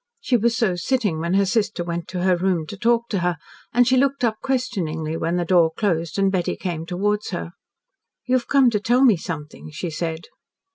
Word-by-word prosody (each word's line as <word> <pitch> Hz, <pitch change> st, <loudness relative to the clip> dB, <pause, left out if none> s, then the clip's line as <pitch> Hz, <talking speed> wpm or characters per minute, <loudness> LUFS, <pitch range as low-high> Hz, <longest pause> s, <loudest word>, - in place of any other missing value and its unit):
She 260 Hz, -, 0 dB
was 230 Hz, 0 st, +2 dB
so 215 Hz, -7 st, +1 dB
sitting 205 Hz, -3 st, 0 dB
when 170 Hz, +3 st, -1 dB
her 200 Hz, 0 st, +4 dB
sister 205 Hz, -2 st, 0 dB
went 170 Hz, -1 st, -4 dB
to 180 Hz, -1 st, -4 dB
her 185 Hz, -1 st, +4 dB
room 175 Hz, -2 st, 0 dB
to -, -, -6 dB
talk 235 Hz, +3 st, +1 dB
to 200 Hz, -, 0 dB
her, 175 Hz, -1 st, 0 dB, 0.3 s
and 245 Hz, 0 st, +3 dB
she 260 Hz, +1 st, +4 dB
looked 275 Hz, 0 st, +1 dB
up 220 Hz, -2 st, +1 dB
questioningly 175 Hz, -12 st, -2 dB
when 165 Hz, +1 st, -1 dB
the 175 Hz, -1 st, 0 dB
door 170 Hz, -2 st, +4 dB
closed 170 Hz, -6 st, -1 dB
and 195 Hz, -1 st, +2 dB
Betty 180 Hz, -3 st, -1 dB
came 165 Hz, -3 st, -4 dB
towards 205 Hz, +3 st, -1 dB
her. 175 Hz, -2 st, -5 dB, 0.7 s
"You 255 Hz, -, -1 dB
have 255 Hz, -2 st, +1 dB
come 270 Hz, -4 st, +4 dB
to 210 Hz, -, +1 dB
tell 245 Hz, +5 st, +2 dB
me 240 Hz, -6 st, +6 dB
something," 155 Hz, -3 st, -7 dB
she 165 Hz, +3 st, -5 dB
said. 160 Hz, 0 st, -4 dB
190 Hz, 210 wpm, -22 LUFS, 170-235 Hz, 0.7 s, me